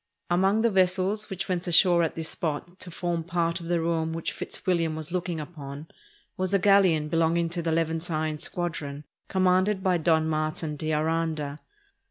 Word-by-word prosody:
Among 195 +5 +3
the 235 - +3
vessels 190 +3 +2
which 195 0 -4
went 180 -1 -2
ashore 175 0 +5
at 165 - -1
this 160 -1 -3
spot 175 +3 -4
to 180 - -5
form 170 -1 -2
part 170 0 -1
of 170 - -8
the 175 0 +1
ruin 165 -1 0
which 165 0 -3
Fitzwilham 170 -4 -1
was 155 +1 -7
looking 175 -2 -2
upon 150 -1 -8 0.5
was 185 +1 0
a - - +6
galleon 185 -6 +4
belonging 165 +1 +1
to 170 +1 -2
the 165 0 -1
Levantine 160 -1 -1
squadron, 155 -5 -3 0.3
com 190 -1 +1
manded 185 +2 +3
by 185 -2 +3
Don 160 0 +2
Martin 155 0 -1
de 155 +2 -3
Aranda. 155 -2 -1
170 Hz, 175 wpm, -27 LUFS, 160-180 Hz, 0.5 s, a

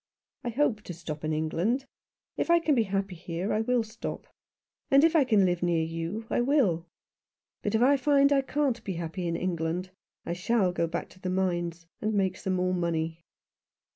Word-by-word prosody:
I 245 - -2
hope 240 -3 +1
to 175 - -6
stop 155 -3 -6
in 155 - -1
England. 170 - 0 0.5
If - - -2
I 340 - +7
can 325 -3 +2
be 235 -5 +3
happy 195 -1 -2
here 170 +2 -3
I 215 - +1
will 245 +1 +2
stop. 220 +1 -6 0.6
And 275 +2 +6
if 330 +1 +4
I 310 - +6
can 215 -7 +4
live 175 -1 0
near 170 -2 +2
you, 165 +7 -4
I - - +1
will. 235 - +2 0.7
But 205 +1 -1
if 225 - +4
I 280 +2 +5
find 280 +1 +4
I 275 - +4
can't 265 -4 -1
be 195 - -3
happy 170 +1 -4
in 170 - -1
England 175 +1 -2 0.3
I 170 - -2
shall 190 +1 +1
go 170 -1 0
back 170 +1 -4
to 185 - -18
the 185 - -3
mines, 175 -2 -1 0.2
and 215 0 0
make 190 -2 +1
some 190 0 -2
more 185 0 +1
money." 165 -2 -2
185 Hz, 200 wpm, -28 LUFS, 170-240 Hz, 0.7 s, I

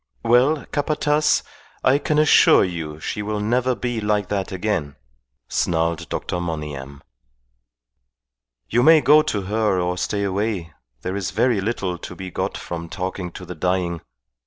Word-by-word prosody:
"Well, 130 +6 +3
Capataz, 150 +1 +1 0.4
I 135 +2 +4
can 150 +1 0
assure 155 0 +6
you 80 -4 -4
she 105 - -4
will 105 0 -2
never 125 +4 +1
be 120 +1 -3
like 105 -2 0
that 100 -2 -2
again," 90 -7 -2 0.5
snarled 85 -1 0
Dr. 90 - -3
Monygham. 75 -5 -5 1.6
"You 120 - +2
may 155 +4 +7
go 150 +2 +6
to 105 -9 -2
her 105 -1 +1
or 90 0 -1
stay 100 +3 -1
away. 100 -4 -2 0.3
There 95 - -3
is 95 -2 -2
very 110 +2 +1
little 95 -4 -2
to 90 - -8
be 95 0 -7
got - - -3
from 85 -1 -6
talking 90 -1 -4
to 90 - -9
the 90 - -7
dying. 90 0 -1
95 Hz, 150 wpm, -22 LUFS, 90-120 Hz, 1.6 s, may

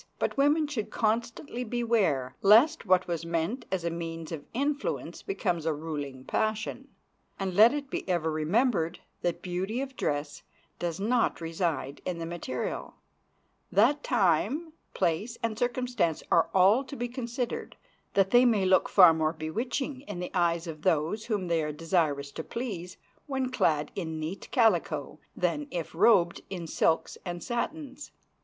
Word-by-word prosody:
But - - -1
women 290 +3 +3
should 270 -8 -3
constantly 235 +3 -1
beware 215 - 0
lest 230 +9 +5
what 185 0 +4
was 170 -2 -2
meant 170 +8 -2
as 190 -3 -1
a 170 - 0
means 165 -1 -5
of 160 -3 -6
influence 290 - -2
becomes 180 - -1
a 160 0 +1
ruling 145 -4 -5
passion. 220 - -2 0.5
And 190 -2 -2
let 215 +5 +7
it 285 -2 -4
be - - -4
ever 165 -3 +1
remembered 170 - +1 0.2
that 175 -1 -2
beauty 190 +6 -2
of 270 -1 -4
dress 145 -5 -2 0.4
does 170 -1 -3
not 230 +4 +1
reside 165 -4 -2
in 180 -2 -3
the 165 - -4
material; 165 -7 -4 0.8
that 245 +10 +4
time, 220 - +1 0.2
place, 205 +9 0
and 230 -1 0
circumstances 245 -7 0
are 165 - +4
all 195 +7 +5
to 270 - -8
be 245 -2 -2
considered; 240 0 -4 0.4
that 195 -1 +3
they 245 +1 +7
may 220 -6 +3
look 185 -1 +4
far 180 -4 +8
more 160 0 0
bewitching 245 - -3
in 200 -4 -5
the 180 - -4
eyes 170 -1 +1
of 155 -3 -7
those 165 +6 +1
whom 205 -5 -1
they 165 -1 +1
are 150 0 -2
desirous 150 -3 0
to 160 - -6
please 195 -7 -5 0.3
when 265 -2 -1
clad 150 - +1
in 160 -4 -4
neat 160 +5 -5
calico 170 - +1 0.2
than 235 +12 -1
if 170 - -4
robed 175 -1 +4
in 180 -3 -5
silks 160 0 0
and 175 -1 -5
satins. 280 +3 -4
185 Hz, 155 wpm, -29 LUFS, 165-240 Hz, 0.8 s, far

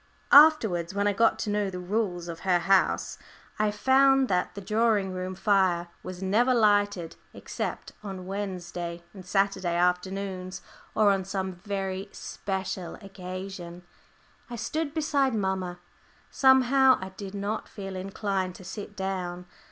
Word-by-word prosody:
Afterwards, 220 - +6
when 200 0 +1
I 205 - +2
got 225 +3 +3
to 210 - -2
know 205 -1 0
the 185 - -6
rules 180 -2 -2
of 170 -1 -7
the 185 -2 +3
house, 195 +2 +2 0.4
I 215 0 +3
found 265 +4 +4
that 180 -2 0
the - - -5
drawing 210 -2 +1
room 185 0 -4
fire 190 -3 +2
was 185 0 -7
never 235 +7 +3
lighted 205 -6 +2 0.2
except - - -5
on 190 -3 -7
Wednesday 175 -3 -5
and 190 - -10
Saturday 190 -2 0
afternoons, 185 +1 -1 0.3
or 210 -2 +5
on 195 -1 0
some 190 0 -3
very 195 +1 -4
special 190 -3 -4
occasion. 185 -2 -8 0.7
I 240 - -5
stood 300 +6 -3
beside 285 -5 +1
mamma. 190 -3 -2 0.5
Somehow 265 0 +5
I 190 - -6
did 195 +1 -8
not 200 +2 -3
feel 195 -2 -7
inclined 190 -1 -2
to - - -11
sit 205 +2 -8
down. 180 -2 -3
195 Hz, 140 wpm, -27 LUFS, 185-210 Hz, 0.7 s, Afterwards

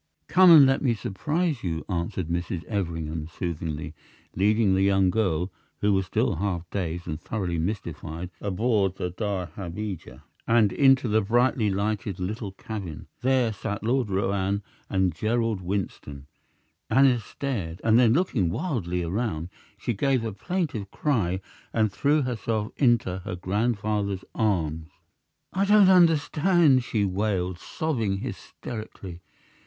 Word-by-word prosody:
"Come 185 +2 +6
and 155 -5 +10
let 135 0 +2
me 125 -5 +2
surprise 150 - -2
you," 80 -3 -3
answered 85 -1 -2
Mrs. 85 0 -3
Everingham, 80 -6 -3
soothingly, 80 -3 -4 0.4
leading 105 +1 +3
the 95 - +2
young 95 -1 +3
girl, 90 -4 0 0.3
who 105 0 +3
was 95 -1 +1
still 110 -3 0
half 90 -2 -2
dazed 85 -3 -3
and 80 0 -4
thoroughly 90 -6 -2
mystified, 85 -2 -4
aboard 100 -1 +1
the 90 -2 -3
dahabeah 95 -1 -5 0.2
and 115 -3 +4
into 135 -3 +4
the 110 0 +3
brightly 120 +1 +2
lighted 100 -1 -2
little 100 +3 -4
cabin. 95 -6 -7
There 125 -3 +2
sat 105 0 -4
Lord 120 0 +1
Roane 100 +1 0 0.3
and 95 -3 +1
Gerald 110 +2 0
Winston. 90 -7 -4 0.6
Aneth 125 0 +4
stared, 95 -11 -4
and 115 +1 +5
then, 120 -3 +5
looking 130 - +1
wildly 90 - -2
around, 90 -2 -2 0.3
she 120 - -2
gave 130 +2 +1
a 110 - -3
plaintive 145 - -3
cry 100 - 0 0.3
and 110 -2 +1
threw 145 +8 +2
herself 110 -3 -2
into 120 -8 +2
her 95 0 -5
grandfather's 100 0 -1
arms. 80 -7 0 0.7
"I 190 - +1
don't 205 -1 +6
understand!" 165 -4 +4
she 110 -5 0
wailed, 95 -2 -1
sobbing 115 -11 -2
hysterically. 110 -5 -7
100 Hz, 130 wpm, -26 LUFS, 90-120 Hz, 0.7 s, and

